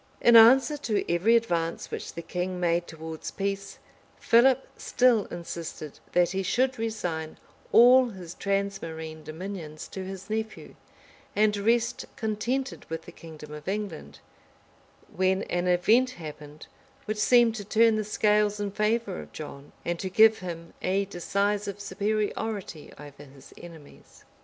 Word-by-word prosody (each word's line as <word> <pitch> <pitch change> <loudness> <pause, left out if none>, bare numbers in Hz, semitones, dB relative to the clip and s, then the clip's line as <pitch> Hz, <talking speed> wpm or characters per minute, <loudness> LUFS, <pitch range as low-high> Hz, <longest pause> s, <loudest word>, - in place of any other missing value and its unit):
In 235 - +5
answer 260 +6 +7
to 210 -10 -1
every 205 +7 +4
advance 170 -8 -1
which - - -6
the 170 - -6
king 180 +2 -3
made 175 0 +1
towards 160 0 -7
peace, 195 0 -4 0.4
Philip 255 +3 +4
still 245 -5 +2
insisted 165 -3 -7
that 175 -1 +3
he 190 +1 -1
should 255 +5 0
resign 175 -9 -3 0.3
all 250 +1 +7
his 180 -5 -9
transmarine 165 -6 -3
dominions 155 -1 -7
to 190 - -6
his 190 +1 -8
nephew 220 0 -4 0.6
and 210 0 +3
rest 230 +3 0
contented 240 +5 -3
with 165 0 -5
the - - -11
kingdom 155 -2 -11
of 150 +1 -10
England; 190 - -5 0.9
when 190 +1 +1
an 175 +1 -2
event 220 +8 +4
happened, 150 -2 -10 0.4
which 215 0 -3
seemed 240 +1 +5
to 215 -2 -6
turn 225 +2 +3
the 215 - -1
scales 210 0 +1
in 205 -1 -2
favor 210 -1 -1
of - - -13
John, 145 -2 -9
and 170 0 -2
to 190 - -3
give 220 +3 +5
him 170 -2 -7
a 195 +2 0
decisive 200 +2 -2
superiority 205 -4 -3
over 145 -1 -12
his 135 -1 -16
enemies. 165 -4 -14
195 Hz, 140 wpm, -27 LUFS, 165-220 Hz, 0.9 s, answer